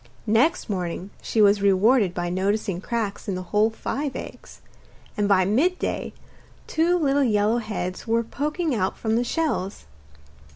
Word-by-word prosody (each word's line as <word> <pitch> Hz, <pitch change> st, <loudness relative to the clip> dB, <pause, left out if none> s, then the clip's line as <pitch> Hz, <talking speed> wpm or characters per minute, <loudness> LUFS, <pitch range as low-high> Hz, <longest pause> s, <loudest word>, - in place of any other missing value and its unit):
Next 240 Hz, +11 st, +2 dB
morning 185 Hz, -1 st, -4 dB
she 220 Hz, -, +2 dB
was 200 Hz, 0 st, +4 dB
rewarded 200 Hz, 0 st, +3 dB
by 175 Hz, 0 st, -2 dB
noticing 195 Hz, 0 st, -1 dB
cracks 220 Hz, -2 st, -3 dB
in 195 Hz, -, -1 dB
the 185 Hz, -, -4 dB
whole 210 Hz, +4 st, +2 dB
five 275 Hz, +5 st, -4 dB
eggs, -, -, -9 dB, 0.6 s
and 205 Hz, -2 st, +1 dB
by 185 Hz, -2 st, +4 dB
midday 295 Hz, -, 0 dB, 0.5 s
two 340 Hz, +2 st, +2 dB
little 285 Hz, -3 st, +2 dB
yellow 215 Hz, -1 st, +2 dB
heads 205 Hz, -3 st, -5 dB
were 230 Hz, +1 st, +2 dB
poking 300 Hz, +6 st, -2 dB
out 190 Hz, -5 st, -1 dB
from 220 Hz, -1 st, -1 dB
the 240 Hz, -, +2 dB
shells. 245 Hz, -, -2 dB
215 Hz, 150 wpm, -24 LUFS, 195-260 Hz, 0.6 s, was